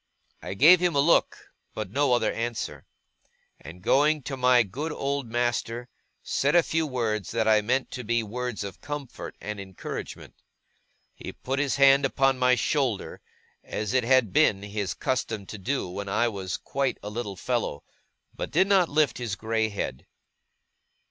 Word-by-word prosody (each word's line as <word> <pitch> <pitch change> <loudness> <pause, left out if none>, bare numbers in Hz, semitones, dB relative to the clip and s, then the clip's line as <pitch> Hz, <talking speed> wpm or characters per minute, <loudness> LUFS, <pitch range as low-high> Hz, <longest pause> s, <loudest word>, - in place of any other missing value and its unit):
I - - -6
gave 165 - +7
him 180 -2 +1
a - - +3
look, 160 +4 +3 0.4
but 105 -3 -5
no 140 +1 +2
other 115 -3 +1
answer; 115 0 -4 0.7
and, 90 +3 -12
going 150 +4 +3
to 135 - -4
my 125 -2 +4
good 135 - -5
old 140 -3 -2
master, 120 0 -2 0.3
said 140 +3 +1
a 175 - +6
few 160 0 0
words 110 - -2
that 115 -1 0
I 110 -1 +5
meant 130 +5 0
to 125 - -5
be 120 +1 0
words 120 +1 -4
of 100 -1 -8
comfort 145 -4 -6
and 105 -1 -6
encouragement. 95 -2 -7 0.8
He - - -8
put 135 +1 -4
his 140 -4 +1
hand 140 0 +6
upon 135 -1 +2
my 125 0 +4
shoulder, 125 -2 -1 0.4
as 105 -2 -4
it 130 -1 +3
had 120 -5 +3
been 100 0 +3
his 100 -1 -3
custom 115 -5 -2
to 105 - -8
do 130 +3 -2
when 100 +3 -6
I 115 +4 +2
was 95 -4 -4
quite 135 -1 -2
a 105 - -5
little 105 -3 -4
fellow, 120 - -2 0.5
but - - -4
did 190 - +3
not 195 -3 +3
lift 150 -3 +1
his 115 -5 -3
grey 110 +2 -1
head. 100 -10 -5
120 Hz, 170 wpm, -26 LUFS, 105-135 Hz, 0.8 s, gave